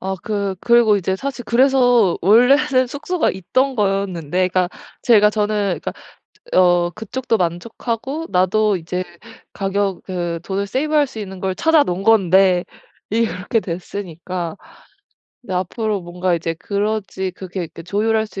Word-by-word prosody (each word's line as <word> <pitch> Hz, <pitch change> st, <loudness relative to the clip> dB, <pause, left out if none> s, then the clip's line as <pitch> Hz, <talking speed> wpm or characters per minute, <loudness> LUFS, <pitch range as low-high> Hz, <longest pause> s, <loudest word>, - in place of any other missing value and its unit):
아 190 Hz, +1 st, -3 dB
그 200 Hz, -3 st, -2 dB
그리고 235 Hz, -3 st, +4 dB
이제 190 Hz, 0 st, -1 dB
사실 265 Hz, +2 st, -5 dB
그래서 245 Hz, -4 st, +4 dB
원래는 255 Hz, -, +4 dB
숙소가 300 Hz, +6 st, -1 dB
있던 255 Hz, +9 st, 0 dB
거였는데 185 Hz, -4 st, 0 dB
그러니까 180 Hz, -1 st, +1 dB, 0.3 s
제가 210 Hz, -4 st, +5 dB
저는 205 Hz, -5 st, -1 dB
그러니까 -, -, -3 dB, 0.6 s
어 175 Hz, -1 st, +4 dB
그쪽도 225 Hz, +3 st, -2 dB
만족하고 230 Hz, -, -3 dB
나도 200 Hz, +3 st, +2 dB
이제 180 Hz, +2 st, -4 dB, 0.5 s
가격 195 Hz, -1 st, -2 dB
그 175 Hz, -3 st, -3 dB
돈을 200 Hz, +1 st, -2 dB
세이브할 295 Hz, +5 st, +1 dB
수 230 Hz, -, -12 dB
있는 190 Hz, -2 st, -7 dB
걸 190 Hz, 0 st, -2 dB
찾아 320 Hz, +3 st, +4 dB
놓은 180 Hz, -2 st, -3 dB
건데 190 Hz, -4 st, +4 dB, 0.5 s
일이 230 Hz, +2 st, +2 dB
그렇게 200 Hz, +4 st, -1 dB
됐으니까 175 Hz, -2 st, -5 dB, 0.9 s
이제 190 Hz, -, -6 dB
앞으로 205 Hz, +3 st, -2 dB
뭔가 180 Hz, +1 st, -1 dB
이제 165 Hz, 0 st, -2 dB
그러지 200 Hz, -2 st, -2 dB
그렇게 180 Hz, -1 st, -6 dB
그 165 Hz, -, -11 dB
조율할 220 Hz, +4 st, 0 dB
수 200 Hz, -, -9 dB
200 Hz, 315 characters per minute, -19 LUFS, 180-230 Hz, 0.9 s, 제가